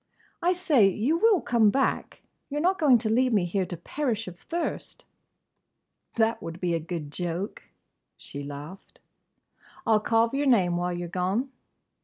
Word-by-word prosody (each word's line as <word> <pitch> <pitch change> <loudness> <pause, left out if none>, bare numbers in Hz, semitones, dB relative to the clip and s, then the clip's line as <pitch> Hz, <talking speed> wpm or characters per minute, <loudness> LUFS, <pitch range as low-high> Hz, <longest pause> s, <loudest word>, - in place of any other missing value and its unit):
"I 355 +2 +3
say! 310 - +4
You 235 - 0
will 430 -3 +4
come 230 -3 +3
back? 270 +5 -1 0.3
You 290 - -4
're - - +1
not 365 +4 +1
going 275 -6 +6
to - - +3
leave 250 +3 +2
me 200 -5 +3
here 185 +1 -1
to 175 - -6
perish 225 - -3
of 180 -1 -9
thirst?" 340 0 -5 1.1
"That 225 0 +1
would 165 +1 -7
be 180 -2 0
a 165 - +1
good 160 -2 -6
joke!" 175 +5 -4 0.6
she 140 - -8
laughed. 145 +6 -9 0.9
"I - - +1
'll 215 - +5
carve 225 +2 +2
your 280 +1 0
name 185 -9 +3
while 175 +1 -1
you 175 0 -4
're 170 - -10
gone!" 195 +9 -1
215 Hz, 175 wpm, -27 LUFS, 175-265 Hz, 1.1 s, going